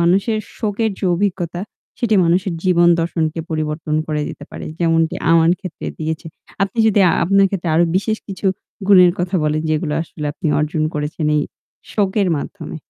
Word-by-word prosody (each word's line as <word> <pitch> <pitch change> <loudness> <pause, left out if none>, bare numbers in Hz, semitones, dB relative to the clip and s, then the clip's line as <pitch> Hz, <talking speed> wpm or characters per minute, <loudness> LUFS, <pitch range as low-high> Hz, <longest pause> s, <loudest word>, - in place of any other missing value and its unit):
মানুষের 195 +6 +2 0.2
শোকের 220 0 0
যে - - -4
অভিজ্ঞতা 175 -2 -2 0.4
সেটি 225 -3 +1
মানুষের 180 +2 +1
জীবন 175 -1 +4
দর্শনকে 165 -1 -1
পরিবর্তন 155 0 -2
করে 150 -1 -1
দিতে 145 - -8
পারে, - - -7
যেমনটি 165 -1 +2 0.2
আমার 165 0 +5
ক্ষেত্রে 185 -3 -7
দিয়েছে। 160 0 -3 0.4
আপনি 195 +4 -2
যদি 210 -2 +4 0.2
আপনার 195 +2 +4
ক্ষেত্রে 180 -3 -3
আরো 170 +2 +5
বিশেষ 215 +3 0
কিছু 195 0 -4 0.4
গুণের 180 -3 +7
কথা 180 +1 0
বলেন, 155 +1 0
যেগুলো 155 -1 0
আসলে 150 -2 -7
আপনি 165 - -5
অর্জন 155 +1 -1
করেছেন 150 +1 -2
এই 150 - +2 0.5
শোকের 200 -1 +1
মাধ্যমে। 160 +2 -6
170 Hz, 160 wpm, -19 LUFS, 155-195 Hz, 0.5 s, গুণের